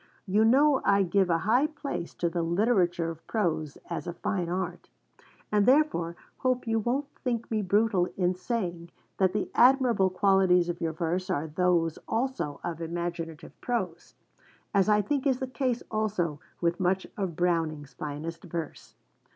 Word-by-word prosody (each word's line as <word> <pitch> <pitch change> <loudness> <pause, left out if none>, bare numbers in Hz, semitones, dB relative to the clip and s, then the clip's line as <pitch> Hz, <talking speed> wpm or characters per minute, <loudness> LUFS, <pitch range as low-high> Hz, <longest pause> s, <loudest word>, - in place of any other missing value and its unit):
You 205 +3 +3
know 270 +4 +5
I 200 0 +4
give 190 +1 +2
a 165 - +3
high 245 +7 +4
place 285 - -5
to 175 - 0
the 170 0 -1
literature 175 -2 +1
of 165 0 -13
prose 160 -9 -1
as 170 - -4
a 175 - -3
fine 175 0 -2
art, 180 0 -4 0.6
and 210 -1 +3
therefore 255 - +3 0.2
hope 255 -1 0
you 225 -1 +1
won't 250 +6 0 0.2
think 235 -3 -2
me 215 -1 +1
brutal 200 -1 +2
in 180 -1 +2
saying 180 -4 -3 0.3
that 190 -2 +4
the 210 0 -2
admirable 245 -6 +5
qualities 185 -2 +3
of 175 - -4
your 165 -1 -1
verse 175 +3 -2
are 145 - 0
those 165 0 +1
also 230 - -2
of 170 -1 -4
imaginative 170 -1 -4
prose; 185 -9 -3 0.6
as 200 0 +3
I 210 0 +4
think 285 +5 0
is 265 -2 +2
the 265 - -3
case 255 -2 -2
also 200 -8 -1 0.2
with 170 0 +1
much 185 +1 +1
of 190 -5 -3
Browning's 160 -5 -1
finest 155 +4 -6
verse. 170 -2 -6
185 Hz, 160 wpm, -28 LUFS, 170-225 Hz, 0.6 s, know